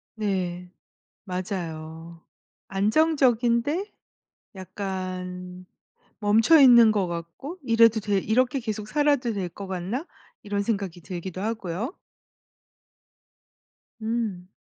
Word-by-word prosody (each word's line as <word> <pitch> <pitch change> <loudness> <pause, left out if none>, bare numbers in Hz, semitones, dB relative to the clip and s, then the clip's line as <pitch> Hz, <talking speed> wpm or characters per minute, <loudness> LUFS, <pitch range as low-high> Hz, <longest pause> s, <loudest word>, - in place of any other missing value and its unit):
네. 180 -4 -2 0.5
맞아요. 170 -3 -6 0.5
안정적인데 255 - +2 0.6
약간 185 -1 -6 0.5
멈춰 220 +9 +5
있는 235 -4 +8
것 200 -4 0
같고 170 - -6
'이래도 230 -2 +5
돼? 205 -1 0
이렇게 250 +6 +1
계속 215 -3 -4
살아도 285 -4 +1
될 185 -3 -3
것 195 +4 -9
같나?' 190 - -3 0.4
이런 205 -1 -1
생각이 195 -5 -3
들기도 185 +1 -6
하고요. 215 - -3 2.0
음. 220 -5 -3
205 Hz, 190 characters per minute, -25 LUFS, 180-235 Hz, 2.0 s, 있는